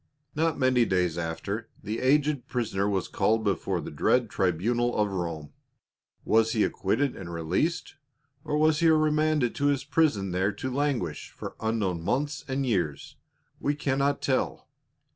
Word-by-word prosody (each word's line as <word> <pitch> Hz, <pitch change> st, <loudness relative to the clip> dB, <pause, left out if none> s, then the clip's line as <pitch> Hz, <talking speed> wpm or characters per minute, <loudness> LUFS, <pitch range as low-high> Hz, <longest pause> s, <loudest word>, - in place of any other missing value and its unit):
Not 160 Hz, 0 st, 0 dB
many 130 Hz, -2 st, +3 dB
days 90 Hz, -6 st, +1 dB
after, 90 Hz, +6 st, -4 dB
the 110 Hz, +2 st, -3 dB
aged 145 Hz, +1 st, +2 dB
prisoner 105 Hz, -5 st, -1 dB
was 95 Hz, -3 st, -1 dB
called 110 Hz, 0 st, +1 dB
before 100 Hz, -6 st, 0 dB
the -, -, -6 dB
dread 120 Hz, -4 st, +1 dB
tribunal 115 Hz, +7 st, +1 dB
of 105 Hz, -1 st, +1 dB
Rome. 85 Hz, -5 st, -4 dB, 0.7 s
Was 110 Hz, 0 st, +3 dB
he 110 Hz, -, +2 dB
acquitted 125 Hz, +8 st, 0 dB
and 85 Hz, -3 st, -8 dB
released, 90 Hz, -, -1 dB, 0.5 s
or 150 Hz, -, -1 dB
was 155 Hz, 0 st, +3 dB
he 165 Hz, -1 st, +4 dB
remanded 155 Hz, -4 st, +2 dB
to 145 Hz, -, 0 dB
his 140 Hz, -2 st, +1 dB
prison 140 Hz, -, +1 dB
there 95 Hz, +3 st, +1 dB
to 130 Hz, +6 st, -4 dB
languish 130 Hz, -, -1 dB
for -, -, -8 dB
unknown 105 Hz, -6 st, -1 dB
months 135 Hz, -, -1 dB
and 135 Hz, 0 st, -1 dB
years? 90 Hz, -, -2 dB, 0.4 s
We 145 Hz, -, 0 dB
cannot 140 Hz, 0 st, 0 dB
tell. 130 Hz, -2 st, -1 dB
120 Hz, 150 wpm, -27 LUFS, 95-145 Hz, 0.7 s, he